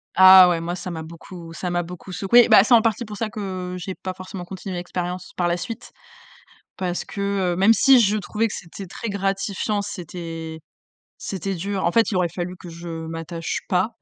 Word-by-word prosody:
Ah 185 0 +10
ouais, 170 -2 +1
moi, 175 +1 -3
ça 180 0 -6
m'a 160 -2 -5
beaucoup 165 +1 -10
ça 180 +1 -4
m'a 175 - +1
beaucoup 180 +2 -9
secouée. 225 +6 +5
Bah, - - +8
c'est 240 +3 +5
en 225 - +5
partie 225 +1 +1
pour 210 -2 -8
ça 220 +1 -2
que 185 -4 -5
j'ai 185 +1 -5
pas 185 - -5
forcément 185 0 -8
continué 190 +1 -7
l'expérience 180 +1 -5
par 175 -1 0
la 175 - +1
suite. 200 +7 -7 0.9
Parce 180 -2 -2
que, 200 - -6 0.3
heu, - - -3
même 195 +5 +5
si 260 +3 +6
je 210 -1 +3
trouvais 215 +3 -1
que - - -7
c'était 185 +2 -9
très 230 +5 -6
gratifiant, 195 +1 -1
c'était 165 -4 -7 0.6
c'était 195 0 -4
dur. 195 +2 -3
En - - +2
fait, 230 +2 +3
il 195 - -1
aurait 180 -1 +2
fallu 175 +2 -5
que 180 - -11
je 170 +1 -9 0.2
m'attache 165 +1 -4
pas. 195 +5 0
185 Hz, 205 wpm, -23 LUFS, 175-200 Hz, 0.9 s, Ah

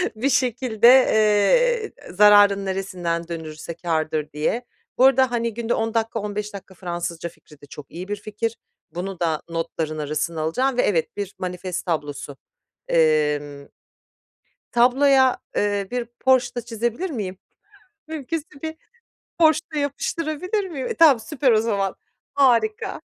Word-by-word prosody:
Bir 260 +6 0
şekilde, 245 -3 +2
eee, 260 - +4
e - - -13
zararın 205 0 +6
neresinden 180 -3 -3
dönülürse 160 -1 -7
kârdır 155 -3 -2
diye. 225 +11 -1 0.3
Bu 260 - +6
arada, 265 -2 +4
hani, 235 -2 -1
günde 235 0 -2
10 225 0 -1
dakika 225 0 -1
15 210 0 -4
dakika 195 -1 -10
Fransızca 170 -2 -5
fikri 150 -3 -20
de - - -12
çok 145 +1 -12
iyi 180 +3 -7
bir 205 - -2
fikir 215 +2 -4 0.3
bunu 185 +1 -5
da 160 -3 0
notların 160 -1 -3
arasına 155 +2 -2
alacağım 250 +11 0
ve, - - +5
evet, 165 -3 0
bir 200 -1 -5
manifest 180 0 -4
tablosu. 145 -4 -4 0.5
Emm 150 -3 +1 1.0
tabloya, 260 +2 +4 0.2
eee, 205 -1 0
bir 245 -1 -2
Porsche 260 -2 +2
da 240 - -2
çizebilir 240 - -3
miyim 195 -9 -4 0.7
mümkünse 315 0 -4 0.2
bir 315 0 -4 0.6
Porsche 315 -2 +5
da - - -1
yapıştırabilir 320 +7 -2
miyim? 275 -6 -5
E, - - -3
tamam 295 -8 +6
süper 265 0 +1
o 215 - +4
zaman, 200 -4 -1 0.4
harika, 420 - +2
210 Hz, 140 wpm, -22 LUFS, 170-260 Hz, 1.0 s, zararın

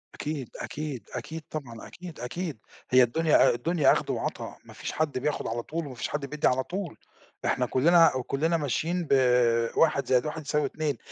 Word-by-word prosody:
أكيد، 145 -5 -4
أكيد، 145 -8 -5
أكيد، 160 0 -5
طبعًا 120 -7 -7
أكيد 175 -2 -10
أكيد 155 +3 -4 0.3
هي 130 0 +7
الدنيا 155 +6 +4
الدنيا 160 +5 +3
أخد - - 0
وعطا - - -3
ما - - -13
فيش - - -5
حد 155 -4 -1
بياخد 145 +3 -1
على 115 +1 -3
طول 165 0 -4
وما 130 -3 -8
فيش - - -3
حد 145 -1 -3
بيدّي 150 +2 0
على 130 +1 +2
طول، 185 -3 -5 0.5
إحنا 125 - +1
كُلّنا 155 0 +4
كُلّنا 160 +4 +1
ماشيين 165 +4 -1
ب - - +4 0.6
1 150 -4 +3
زائد 125 +2 +3
1 155 +1 -4
يساوي 150 +1 0
2 150 -5 -2
150 Hz, 180 wpm, -27 LUFS, 130-160 Hz, 0.6 s, هي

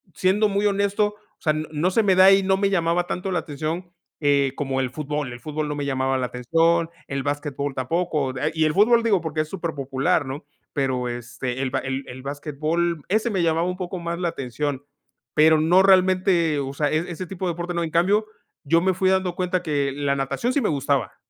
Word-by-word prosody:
siendo 205 +3 +2
muy 200 +1 0
honesto, 205 +1 +1 0.3
o - - -47
sea, 155 - +2
no 155 +3 -1
se 225 - +3
me 195 -2 +3
da, 190 +1 +8
y 195 0 +5
no 190 0 +2
me 200 0 +1
llamaba 170 -1 +1
tanto 190 +1 -3
la 180 - +1
atención, 160 +4 -5 0.3
eh, 140 -2 +2
como 135 -2 -2
el 130 - -1
fútbol. 150 -1 -3
El 120 - -9
fútbol 155 0 -3
no 150 - -3
me 145 -1 -3
llamaba 135 -1 0
la 125 -1 -1
atención, 165 +7 +1 0.2
el 135 -1 -3
basquetbol 145 -1 -3
tampoco, 150 0 -1 0.2
y 160 -1 +2
el 155 - +1
fútbol 230 +4 +4
digo 205 -6 +2
porque 160 -1 -2
es 155 - -5
superpopular, 150 -3 -1
¿no? 135 +3 -6 0.3
Pero, 130 -3 -1
este, 120 +2 -5
el 130 - 0
ba - - 0
el 130 +1 -3
el 130 +1 -9
basquetbol, 155 +3 -2
ese 220 +4 +1
me 190 -5 0
llamaba 165 +1 +1
un 180 0 -3
poco 185 -1 -5
más 170 0 -4
la 175 -1 0
atención. 140 0 -4 0.5
Pero 155 +1 +6
no 175 +4 +5
realmente, 185 -4 +3
o 135 0 -3
sea, 145 +1 0
es-ese 175 +3 -2
tipo 190 +1 -5
de 175 - 0
deporte 175 +1 -4
no. 170 - -1
En 160 - -4
cambio, 195 +6 +2 0.4
yo 165 +3 +3
me 190 +1 +2
fui 185 +1 +1
dando 190 -2 +1
cuenta 180 0 -1
que 145 -4 0
la 140 0 0
natación 140 - -1
sí 285 - +1
me 215 - +1
gustaba. 140 -1 0
160 Hz, 215 wpm, -23 LUFS, 140-185 Hz, 0.5 s, da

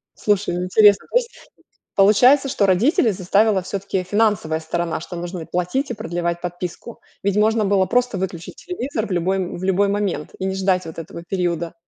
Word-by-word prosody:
Слушай, 205 -4 0
ну 180 - -2
интересно, 205 +1 +5
то - - +3
есть, 480 -1 -5 0.5
получается, 245 +8 +5
что 205 - +1
родителей 220 - +3
заставила 195 +2 +2
все-таки 195 0 -3
финансовая 200 -5 +1
сторона, 165 +1 -3
что 175 +2 -8
нужно 175 +1 -5
и - - -7
платить, 180 +10 -2
и - - -1
продлевать 175 -4 -3
подписку. 180 +5 -6 0.2
Ведь 200 0 0
можно 215 0 +3
было 195 -1 +2
просто 245 -3 0
выключить 175 -2 -5
телевизор 275 - -4
в - - -9
любой 185 +2 0 0.2
в 175 - -8
любой 195 +2 +2
момент 200 -6 -2
и 190 - -3
не 190 0 -2
ждать 190 -1 +1
вот 160 - -9
этого 170 +1 -8
периода. 170 -3 -2
190 Hz, 180 wpm, -21 LUFS, 175-215 Hz, 0.5 s, интересно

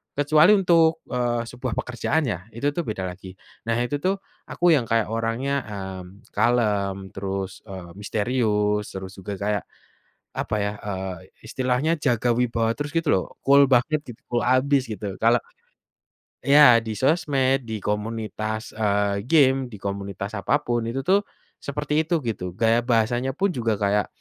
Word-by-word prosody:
kecuali 155 +7 +5
untuk, 165 -4 +4
eee, 120 -1 0
sebuah 125 -2 -4
pekerjaan 125 +6 -1
ya 95 -1 -4
itu 140 +5 0
tuh 170 - -2
beda 105 -4 -4
lagi 95 +1 -10 0.3
nah 115 - +1
itu 135 +4 -1
tuh 195 +1 0 0.3
aku 175 0 +2
yang 125 -5 0
kayak 115 -2 +1
orangnya, 115 +5 -1
mmm, 95 0 -8
kalem 100 -4 +1
terus, 95 -1 -4
eee, 90 -3 -8
misterius 105 -1 0
terus 95 0 -7
juga 100 +2 -6
kayak, 105 -1 0 0.8
apa 110 - -1
ya, 105 - -1 0.2
eee, 95 -1 -3 0.3
istilahnya 130 +5 0
jaga 120 -1 +2
wibawa 115 -2 +1
terus 145 0 -4
gitu 165 -2 -1
loh 95 - +1 0.2
cool 140 +1 +7
banget 150 +6 +3
gitu 120 -1 -10
cool 120 -1 0
abis 140 0 +2
gitu 100 -2 -5
kalau 115 +1 +4 1.1
Ya 140 -4 +8
di 110 -1 -4
sosmed, 135 - +1
di 110 -3 -5
komunitas, 110 +1 -3
eee, 100 -1 0
game 135 -4 +4
di 120 - -12
komunitas 100 +1 -5
apa 145 +9 +1
pun 120 -1 -1
itu 130 +3 -3
tuh, 200 +5 +2 0.3
seperti 150 +2 -1
itu 165 -3 0
gitu 90 -6 -4
gaya 115 +2 +3
bahasanya 120 +2 +1
pun 195 +4 +1
juga 115 -8 0
kayak, 100 0 +1
115 Hz, 155 wpm, -24 LUFS, 105-135 Hz, 1.1 s, Ya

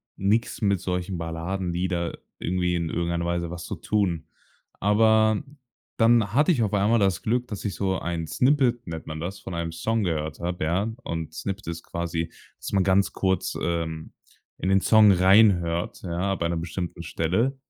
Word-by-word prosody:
nix 105 +4 0
mit 100 -2 +2
solchen 90 0 -3
Balladenlieder 85 +1 -2 0.2
irgendwie 90 0 0
in 85 -2 -1
irgendeiner 85 0 -1
Weise 85 -1 -2
was 85 0 -6
zu 100 - -4
tun. 90 -3 -1 0.5
Aber 110 +2 +4 0.5
dann 115 -3 +4
hatte 150 +7 +4
ich 130 -9 +2
auf 105 - -1
einmal 105 +3 +3
das 95 -5 +1
Glück, 125 +2 0
dass 105 -4 -6
ich 100 - -3
so 95 -1 0
ein 85 -1 -3
Snippet, 125 - +2
nennt 80 -1 -6
man 80 0 -6
das, 95 +4 -5
von 95 - -8
einem 85 -1 -3
Song 110 +7 -1
gehört 80 -3 -2
hab, 90 +1 -3
ja, 90 +8 0
und 80 -2 -4
Snippet 100 0 -5
ist 85 0 -5
quasi, 85 -1 -3 0.3
dass - - -7
man 95 -2 +3
ganz 95 +1 +2
kurz, 95 -1 0
ähm, 80 -2 -3 0.4
in 95 - -2
den 95 0 +4
Song 110 0 +6
reinhört, 90 -3 +4
ja, 90 +2 -1
bei 85 -3 -1
'ner 85 - -1
bestimmten 85 +1 -5
Stelle. 95 - 0
90 Hz, 175 wpm, -25 LUFS, 85-105 Hz, 0.5 s, Song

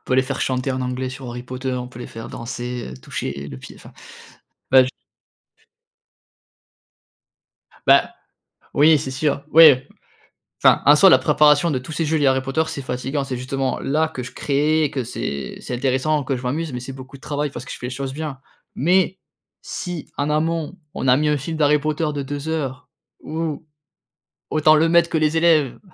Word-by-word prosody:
on - - -45
peut 130 - 0
les 130 - +4
faire 135 +1 -4
chanter 130 +1 -1
en 130 - -3
anglais 125 +1 -3
sur 130 0 -8
Harry 120 0 -6
Potter, 130 +1 -4
on 125 0 -4
peut 125 -1 -12
les - - -6
faire 115 0 -8
danser, 120 - -6
heu, - - -8
toucher 70 +1 -5
le 65 - -8
pied, - - -12
enfin, - - -14 0.8
bah 130 0 +8
j 130 - -4 3.0
Bah, - - +5 0.6
oui, 155 +2 +6
c'est 135 - -4
sûr, 140 +1 -1
oui. 160 -1 +10 0.9
Enfin, - - +5
en 145 +1 +7
soi 190 +5 +7
la 130 - +7
préparation 150 +3 +4
de 135 - 0
tous 130 +5 -9
ces 160 +2 -1
jeux, 160 +1 +1
les 145 - +2
Harry 130 0 +3
Potter, 135 +4 0
c'est 150 -4 -5
fatigant, 130 +3 -3
c'est 135 -2 -4
justement 130 +1 -2
là, 155 +3 0
que 130 -5 -6
je - - -9
créais 150 +3 +1
et 150 - +1
que 130 -4 -3
c'est 70 - -5
c'est 125 - -5
intéressant, 135 +3 0
que 135 - -1
je 125 - -8
m'amuse. 150 +5 -2
Mais 125 - -4
c'est 130 +2 -7
beaucoup 130 +1 -11
de - - -20
travail 145 +1 -3
parce - - -8
que - - -11
je - - -8
fais 125 - -5
les - - -5
choses 135 +1 -4
bien. 150 -2 -5 0.4
Mais 185 +4 +2 0.4
si 175 -4 -6
en 145 - -1
amont, 160 +2 -1 0.2
on - - -3
a 125 0 +5
mis 150 +2 +1
un 150 - +2
film 160 +4 -4
d'Harry 150 -1 +3
Potter 155 +2 -1
de 145 - -2
2 145 +2 -5
heures 140 -4 -3 0.3
où, 160 0 -4 0.9
autant 155 0 +5
le 160 +2 +3
maître 170 0 +4
que - - 0
les 155 0 +1
élèves, 160 -5 +3
140 Hz, 205 wpm, -21 LUFS, 130-155 Hz, 3.0 s, oui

